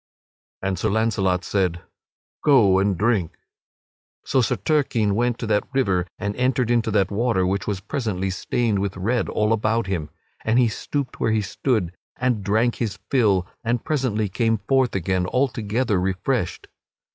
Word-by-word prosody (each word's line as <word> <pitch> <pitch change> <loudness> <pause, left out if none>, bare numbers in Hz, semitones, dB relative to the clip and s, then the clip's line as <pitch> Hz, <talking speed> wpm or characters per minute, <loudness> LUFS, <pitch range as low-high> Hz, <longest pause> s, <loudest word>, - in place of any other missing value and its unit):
And 95 -2 -1
Sir 110 - 0
Launcelot 100 -4 +1
said: 90 -4 -1 0.6
"Go 110 -10 +5
and 100 -1 +1
drink." 105 -5 0 0.9
So 130 - +2
Sir 110 - +1
Turquine 125 -9 +1
went 120 +2 +1
to - - -4
that 105 -1 +1
river 95 -9 +1
and 105 0 -3
entered 125 -1 +1
into 120 -1 +2
that 100 -2 +1
water, 105 -3 +1
which 95 +1 -1
was 100 -3 -2
presently 95 -5 -2
stained 110 +2 0
with 95 -1 -2
red 115 +6 0
all 105 +1 +1
about 110 +1 +1
him. 85 -6 -3 0.3
And 110 +2 +2
he 125 -2 +4
stooped 140 +4 -4
where - - +1
he 110 -1 +1
stood 100 -6 -1 0.2
and 125 -5 0
drank 110 +4 +1
his 105 -5 -2
fill, 105 -9 +3 0.2
and 115 0 -1
presently 125 -8 0
came 115 +3 +1
forth 130 -4 +2
again 95 0 0
altogether 115 -4 0
refreshed. 95 0 -2
110 Hz, 155 wpm, -23 LUFS, 95-120 Hz, 0.9 s, Go